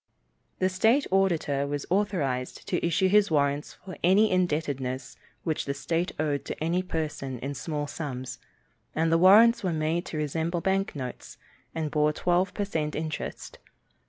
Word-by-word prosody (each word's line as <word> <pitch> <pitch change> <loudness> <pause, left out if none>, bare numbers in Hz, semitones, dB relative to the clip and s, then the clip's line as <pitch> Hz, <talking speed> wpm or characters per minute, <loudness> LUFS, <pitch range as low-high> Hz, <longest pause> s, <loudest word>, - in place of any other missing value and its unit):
The 185 - +2
state 220 +9 +3
auditor 165 -7 +1
was 145 0 -3
authorized 155 -11 -1
to - - -1
issue 175 +3 +2
his 205 +1 +4
warrants 145 -1 0
for 185 - -8
any 200 +5 +5
indebtedness 145 -7 -1 0.3
which 160 -3 -1
the 140 - -2
state 165 +4 -1
owed 145 -2 0
to - - -5
any 170 +3 0
person 155 -7 -4
in 140 +4 -4
small 145 +2 -3
sums, 130 -4 -6 0.6
and 160 +1 +1
the 165 - +4
warrants 215 +5 +7
were 185 - 0
made 160 +2 -1
to 155 - -5
resemble 160 +3 -1
bank 195 +1 0
notes, 125 -3 -7 0.4
and 155 -2 -2
bore 150 0 +2
twelve 180 +3 +1
per 205 - -1
cent 155 -6 -2
interest. 155 0 -5
160 Hz, 160 wpm, -27 LUFS, 145-185 Hz, 0.6 s, warrants